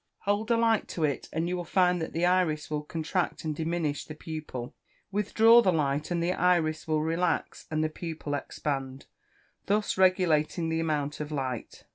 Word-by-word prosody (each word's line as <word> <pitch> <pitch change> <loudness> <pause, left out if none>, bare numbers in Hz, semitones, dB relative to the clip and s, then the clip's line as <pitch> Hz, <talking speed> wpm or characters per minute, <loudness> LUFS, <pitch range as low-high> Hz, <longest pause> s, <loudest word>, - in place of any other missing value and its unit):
Hold 205 +3 0
a 235 - +4
light 225 -2 +2
to 165 - -3
it, 145 -3 -1
and 165 +2 -1
you 180 - -1
will 175 - -3
find 180 0 +2
that 160 - -3
the 170 +2 0
iris 175 -5 +1
will 150 -1 -1
contract 165 +4 -2
and 155 -1 -1
diminish 160 -2 -1
the 155 - -9
pupil; 150 -5 -6 0.4
withdraw 220 +3 +5
the 190 - +3
light, 150 -2 0
and 170 -1 0
the 175 +2 +1
iris 170 -4 +1
will 155 -1 +1
relax, 165 +1 -1
and 155 0 0
the 155 - 0
pupil 155 -2 -5
expand, 135 -1 -3 0.6
thus 205 -1 +1
regulating 170 -3 +3
the 160 0 0
amount 150 -3 -1
of 150 0 -5
light. 130 -5 -4
160 Hz, 180 wpm, -28 LUFS, 150-180 Hz, 0.6 s, withdraw